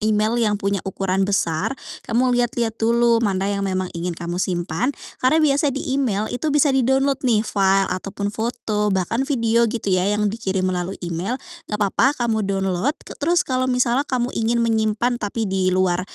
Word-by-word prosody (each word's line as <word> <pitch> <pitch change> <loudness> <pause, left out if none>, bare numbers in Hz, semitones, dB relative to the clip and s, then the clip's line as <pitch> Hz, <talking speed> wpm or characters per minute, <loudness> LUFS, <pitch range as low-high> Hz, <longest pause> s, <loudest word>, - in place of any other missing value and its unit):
email 215 0 +1
yang 210 -3 +2
punya 200 -1 -1
ukuran 195 0 -1
besar, 180 +4 0 0.3
kamu 250 +2 +2
lihat-lihat 240 -2 0
dulu 235 0 +3
mana 200 -2 0
yang 200 - -2
memang 185 -2 -2
ingin 170 0 -4
kamu 175 +1 -4
simpan, 175 +4 -1 0.3
karena 255 +5 +3
biasa 290 +1 +3
di 275 -1 -3
email 235 -7 0
itu 250 +6 -2
bisa 290 -1 +3
di-download 265 +1 +2
nih 225 -4 +2
file, 195 -2 +2
ataupun 195 +2 -4
foto, 220 -2 -1
bahkan 205 +7 0
video, 235 -4 +2
gitu 215 -3 -2
ya, 185 +1 +2
yang 210 0 +1
dikirim 195 -4 -2
melalui 185 0 -2
email, 175 +8 -2 0.3
nggak 210 - -2
papa 220 +7 +2
kamu 230 -3 0
download. 195 - 0
K - - -9
terus 340 +4 +2
kalau 255 -2 0
misalnya 250 +2 +1
kamu 250 -1 -1
ingin 230 +1 +1
menyimpan 225 +2 0
tapi 215 +2 -2
di 190 -2 0
luar 185 -1 +2
215 Hz, 175 wpm, -21 LUFS, 195-245 Hz, 0.3 s, dulu